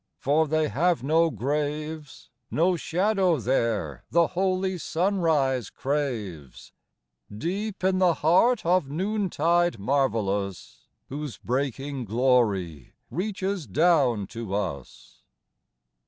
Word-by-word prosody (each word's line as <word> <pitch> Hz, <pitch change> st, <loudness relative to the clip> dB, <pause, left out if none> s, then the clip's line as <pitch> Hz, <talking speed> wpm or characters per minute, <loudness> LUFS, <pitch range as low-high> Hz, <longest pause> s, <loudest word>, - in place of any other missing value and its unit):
For 155 Hz, +3 st, +2 dB
they 155 Hz, +1 st, +1 dB
have 170 Hz, 0 st, +1 dB
no 165 Hz, +4 st, +3 dB
graves; 150 Hz, +3 st, -4 dB, 0.2 s
No 175 Hz, +3 st, +2 dB
shadow 185 Hz, +1 st, +1 dB
there 115 Hz, -, -1 dB
the 170 Hz, -1 st, +3 dB
holy 185 Hz, 0 st, -1 dB
sunrise 160 Hz, -, 0 dB
craves, 115 Hz, -, -4 dB, 0.6 s
Deep 185 Hz, -, -4 dB
in 185 Hz, 0 st, +2 dB
the 180 Hz, -3 st, +4 dB
heart 185 Hz, +10 st, +3 dB
of 175 Hz, -5 st, +2 dB
noontide 175 Hz, -, +1 dB
marvellous, 105 Hz, -6 st, -1 dB, 0.2 s
Whose 145 Hz, -1 st, -5 dB
breaking 135 Hz, +1 st, -3 dB
glory 105 Hz, -, +1 dB, 0.2 s
reaches 190 Hz, -, -3 dB
clown 135 Hz, -, +3 dB
to 115 Hz, -4 st, -4 dB
us. 90 Hz, -10 st, -6 dB
150 Hz, 95 wpm, -26 LUFS, 120-175 Hz, 0.6 s, the